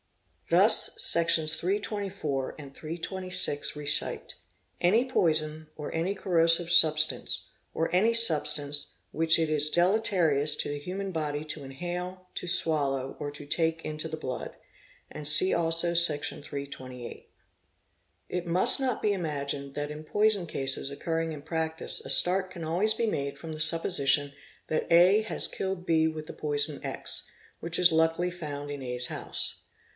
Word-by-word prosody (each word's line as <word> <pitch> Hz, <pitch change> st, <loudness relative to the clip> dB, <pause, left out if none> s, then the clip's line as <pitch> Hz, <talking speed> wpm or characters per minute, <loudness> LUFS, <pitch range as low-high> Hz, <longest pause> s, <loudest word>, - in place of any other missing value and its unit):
'Thus -, -, +5 dB
ss. 165 Hz, -2 st, +3 dB
324 195 Hz, -7 st, -3 dB
and 140 Hz, -3 st, -12 dB
826 175 Hz, -1 st, -3 dB
recite 145 Hz, 0 st, -2 dB, 0.3 s
'' -, -, -36 dB
Any 215 Hz, +8 st, +3 dB
poison 155 Hz, -5 st, 0 dB
or 150 Hz, -, -7 dB
any 170 Hz, +4 st, -1 dB
corrosive 170 Hz, -2 st, +2 dB
substance,.... 155 Hz, -3 st, +3 dB, 0.3 s
or 165 Hz, -, -2 dB
any 220 Hz, +5 st, +3 dB
substance 150 Hz, -9 st, +1 dB, 0.2 s
which 160 Hz, 0 st, +4 dB
it 160 Hz, -, +1 dB
is 150 Hz, -1 st, +1 dB
deleterious 175 Hz, -6 st, +1 dB
to -, -, -4 dB
the 145 Hz, 0 st, -4 dB
human 190 Hz, +5 st, -6 dB
body 150 Hz, -2 st, -3 dB
to 150 Hz, -1 st, -5 dB
inhale, 180 Hz, +6 st, -6 dB
to -, -, -5 dB
swallow, 140 Hz, -6 st, 0 dB
or 145 Hz, -, -4 dB
to 145 Hz, 0 st, -9 dB
take 165 Hz, +2 st, -1 dB
into 155 Hz, +1 st, -4 dB
the 160 Hz, -, -6 dB
blood''; 130 Hz, -6 st, -6 dB, 0.5 s
and 150 Hz, -, -9 dB
see 150 Hz, +6 st, +2 dB
also 165 Hz, +1 st, +1 dB
sec. 170 Hz, -4 st, +4 dB
328. 130 Hz, -4 st, -8 dB, 1.0 s
It 180 Hz, -1 st, -5 dB
must 175 Hz, +9 st, +6 dB
not 260 Hz, -3 st, -2 dB
be 210 Hz, -, +1 dB
imagined 140 Hz, -5 st, -5 dB
that 145 Hz, 0 st, -4 dB
in 150 Hz, +1 st, -9 dB
poison 205 Hz, +1 st, +2 dB
cases 135 Hz, -2 st, -2 dB
occurring 165 Hz, +3 st, -3 dB
in 150 Hz, -2 st, -9 dB
practice 160 Hz, 0 st, -1 dB
a -, -, -9 dB
start 185 Hz, +1 st, +5 dB
can 175 Hz, -3 st, -9 dB
always 185 Hz, +7 st, +2 dB
be 230 Hz, -, -1 dB
made 140 Hz, -7 st, -3 dB
from 160 Hz, +2 st, -8 dB
the 155 Hz, -, -9 dB
supposition 150 Hz, -3 st, +4 dB, 0.3 s
that 155 Hz, -, -3 dB
A 180 Hz, +5 st, +5 dB
has 220 Hz, -, -3 dB
killed 190 Hz, -2 st, -5 dB
B 160 Hz, -2 st, +2 dB
with 155 Hz, -1 st, -6 dB
the -, -, -9 dB
poison 145 Hz, -1 st, 0 dB
X, -, -, -3 dB, 0.3 s
which 165 Hz, +1 st, -1 dB
is 180 Hz, -1 st, +8 dB
luckily 165 Hz, +2 st, +1 dB
found 145 Hz, -4 st, -7 dB
in 145 Hz, -1 st, -6 dB
A's 125 Hz, -1 st, -1 dB
house. -, -, -3 dB
160 Hz, 150 wpm, -27 LUFS, 145-180 Hz, 1.0 s, is